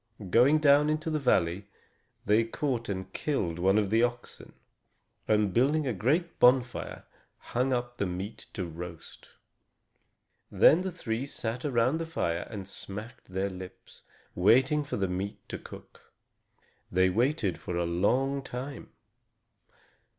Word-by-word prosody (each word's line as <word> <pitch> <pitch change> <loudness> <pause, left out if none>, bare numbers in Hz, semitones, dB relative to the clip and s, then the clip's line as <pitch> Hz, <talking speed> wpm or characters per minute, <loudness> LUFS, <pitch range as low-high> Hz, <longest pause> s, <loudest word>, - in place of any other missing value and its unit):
Going 130 +8 +6
down 150 0 +5
into 155 +1 -1
the 155 - 0
valley, 95 - +1 0.6
they 105 +2 +4
caught 115 0 -2
and 95 -1 -5
killed 90 - -2
one 95 +3 +3
of 105 -2 +1
the 115 +1 +4
oxen, 120 0 -3 0.7
and, 105 -3 +2
building 145 +7 +2
a 125 - 0
great 155 - 0
bonfire, 125 0 +2 0.3
hung 125 +2 -1
up 120 -1 -2
the 100 - -1
meat 95 +4 -6
to 95 -5 -2
roast. 85 0 -9 1.2
Then 165 - +5
the 190 - -2
three 130 -7 -4
sat 120 -1 -4
around 130 +2 +2
the 165 - -4
fire 85 - -2
and 100 -4 -7
smacked 105 +4 -8
their 95 +1 -2
lips, 90 0 -11 0.3
waiting 130 - +4
for 145 - -4
the 100 -1 0
meat 95 +3 -3
to - - -5
cook. - - -14 0.8
They 95 +1 +3
waited 115 - 0
for 90 - -4
a 85 - 0
long 125 +11 +1
time. 135 +1 -7
115 Hz, 140 wpm, -29 LUFS, 95-135 Hz, 1.2 s, Going